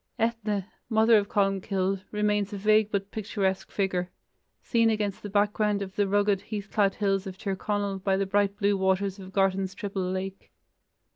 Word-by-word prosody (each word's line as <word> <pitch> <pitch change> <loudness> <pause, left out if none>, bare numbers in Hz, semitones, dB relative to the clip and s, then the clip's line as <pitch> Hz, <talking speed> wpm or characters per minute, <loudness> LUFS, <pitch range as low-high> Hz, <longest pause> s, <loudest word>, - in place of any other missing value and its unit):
Ethne, 220 -4 -1 0.2
mother 220 0 +5
of 200 0 -4
Columcille, 195 -1 0
remains 210 -1 0
a 205 - -4
vague 215 +1 +3
but 200 -1 -2
picturesque 195 -3 -2
figure, 185 -3 -1 0.5
seen 230 -2 +3
against 210 -3 -1
the 205 - -6
background 205 0 +1
of 190 -1 -9
the 205 -1 +2
rugged 205 0 +2
heath 210 -2 -6
clad 200 -2 +2
hills 195 -2 0
of 190 -1 -7
Tir 195 -1 -2
Conal 200 -1 -2
by 190 0 +1
the 195 - 0
bright 200 +1 +1
blue 205 -1 +2
waters 190 +1 0
of 190 -1 -10
Gartan's 195 0 +1
triple 200 -1 -3
lake. 190 +1 -5
200 Hz, 170 wpm, -27 LUFS, 195-210 Hz, 0.5 s, mother